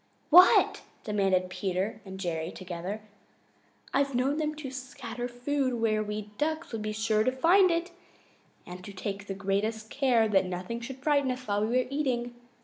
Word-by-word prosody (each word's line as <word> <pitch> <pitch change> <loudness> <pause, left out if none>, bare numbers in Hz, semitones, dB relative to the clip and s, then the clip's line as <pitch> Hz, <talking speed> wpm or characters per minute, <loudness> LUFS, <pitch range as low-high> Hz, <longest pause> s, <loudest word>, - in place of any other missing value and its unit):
"What?" 360 +3 +7 0.2
demanded 195 -3 +1
Peter 190 +3 -2
and 190 0 -8
Jerry 165 -3 -2
together. 185 +3 -6 0.9
"I've 275 -1 +1
known 270 +4 +1
them 305 -1 -1
to 290 -4 -7
scatter 255 -2 -6
food 255 +1 -1
where 220 -2 +1
we 210 0 -5
Ducks 315 +2 -1
would 225 -2 -4
be 215 0 -2
sure 215 0 +1
to 255 - +2
find 355 +9 +5
it 340 +1 -1 0.7
and 180 +1 -9
to 200 - -9
take 200 +1 -5
the 195 - -4
greatest 210 +3 -2
care 250 -5 +3
that 195 -3 +2
nothing 185 +6 -4
should 260 +2 -8
frighten 285 -3 +2
us 255 0 -4
while 205 0 +1
we 225 +4 +1
were - - -12
eating. 250 -4 -1
225 Hz, 170 wpm, -29 LUFS, 200-270 Hz, 0.9 s, What